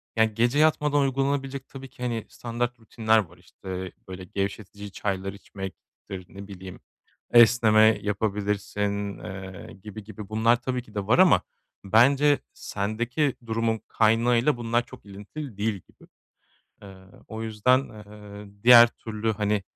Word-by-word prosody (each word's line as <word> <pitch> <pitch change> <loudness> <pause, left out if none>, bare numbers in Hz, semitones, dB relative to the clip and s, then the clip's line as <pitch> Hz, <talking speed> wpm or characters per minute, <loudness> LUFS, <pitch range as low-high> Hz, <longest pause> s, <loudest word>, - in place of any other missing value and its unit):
ya, 110 - +4
gece 120 +5 +1
yatmadan 150 -2 +3
uygulanabilecek 135 0 -1
tabii 135 -1 -10
ki, 125 - -11
hani, 115 -3 -2
standart 120 +1 -4
rutinler 110 0 +1
var, 90 -4 -6
işte, 95 +1 -8 0.2
böyle, 95 0 -8
gevşetici 100 +2 -5
çaylar 95 -1 -3
içmektir, 95 -1 -10
ne 100 0 -10
bileyim, 95 -2 -10 0.5
esneme 110 -2 +6
yapabilirsin, 105 -1 -2
eee, 95 -1 -9
gibi 105 0 -9
gibi 105 -1 -10
bunlar 115 +2 +2
tabii 125 0 -2
ki 110 -3 -19
de 100 -1 -3
var 125 - +3
ama 185 -1 +6 0.4
bence 140 +8 +4
sendeki 120 +8 -2
durumun 115 -1 -1
kaynağıyla 115 +4 +2
bunlar 120 0 0
çok 130 - -14
ilintili 105 +5 -9
değil 110 +2 0
gibi. 95 - -15 0.8
Eee, 100 -1 -12 0.3
o 110 0 -6
yüzden, 115 +4 +2
eee, 105 -1 -13
diğer 120 -1 +9
türlü, 110 -1 -4
hani, 105 -1 -1
110 Hz, 135 wpm, -25 LUFS, 100-120 Hz, 0.8 s, diğer